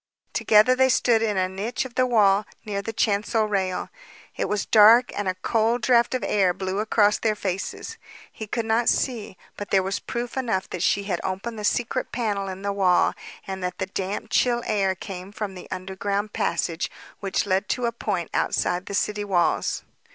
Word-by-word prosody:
Together 220 +4 +5
they 260 0 +4
stood 235 -2 +3
in 215 -3 0
a 185 0 +2
niche 200 +8 -3
of 255 - -9
the 255 +1 +2
wall 205 -4 +4 0.2
near 200 -2 -2
the 225 - -5
chancel 215 0 +1
rail. 190 -3 -1 0.5
It - - -2
was 210 -1 -1
dark 225 +3 +6
and 205 -1 -2
a 185 - 0
cold 230 +1 +1
draft 240 +1 +3
of 255 - -2
air 190 -4 +2
blew 190 +1 -3
across 210 -1 +3
their 220 -2 +1
faces. 195 - -4 0.3
He 220 - -8
could 230 +2 -2
not 225 +1 +2
see, 225 -7 -1 0.2
but 205 - -6
there 190 -1 +3
was 195 +1 -2
proof 240 0 -5
enough 225 -8 -1
that 180 - -4
she 200 +2 +2
had 185 -4 -2
opened 205 +4 -4
the - - -6
secret 245 +4 -1
panel 205 -5 -2
in 190 +1 -7
the 200 0 -1
wall, 185 -3 +3 0.3
and 190 -1 -5
that 180 - -3
the 190 - -2
damp, 195 +3 -4
chill 240 -1 +2
air 195 -3 +1
came 185 0 -8
from 210 -2 -5
the 180 - -11
underground 195 +3 -3
passage, 170 0 -1 0.3
which 195 0 -1
led 190 +1 0
to 250 - 0
a 235 - +1
point 205 -7 -3
outside 180 +1 0
the 200 - -3
city 210 +1 0
walls. 185 -4 0
205 Hz, 195 wpm, -24 LUFS, 190-225 Hz, 0.5 s, dark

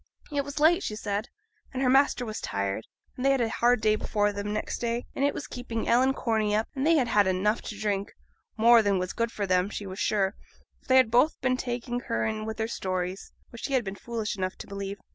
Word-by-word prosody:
It 285 -1 0
was 285 +1 -6
late, 340 +5 +5
she 215 - -3
said, 210 +2 -3 0.4
and 260 +1 -2
her - - +3
master 270 -1 +3
was 215 -1 -5
tired, 100 +1 -2 0.3
and 250 - -5
they 275 - +4
had 270 -1 +3
a 230 -2 +1
hard 240 0 +2
day 215 -1 +3
before 205 -1 0
them 205 +1 -4
next 215 - -3
day; 235 +1 -2
and 275 - -2
it 285 - +3
was - - -6
keeping 240 -2 -5
Ellen 260 +3 +4
Corney 215 -3 0
up; 215 +1 0
and 275 +2 -1
they 330 - +5
had 265 -6 +2
had 205 -3 +4
enough 195 +4 +1
to 210 - -7
drink, 205 -2 -2 0.4
more 230 +1 +7
than 200 -2 +2
was 185 0 -2
good 230 0 -1
for 205 - -2
them, 185 0 +2
she 210 - -5
was 190 0 -7
sure, 195 -3 +1 0.5
for - - -28
they 260 - +5
had 255 -4 +5
both 250 +7 +3
been 255 -1 +2
taking 245 -1 -3
her 230 - -2
in 215 -1 -2
with 220 0 -5
their 220 - -1
stories, 185 -3 -3 0.2
which 235 - -7
she 275 - -3
had 255 -2 +3
been 195 - -4
foolish 220 0 -4
enough 185 -1 -2
to - - -9
believe. 200 0 -5
220 Hz, 245 wpm, -27 LUFS, 200-250 Hz, 0.5 s, more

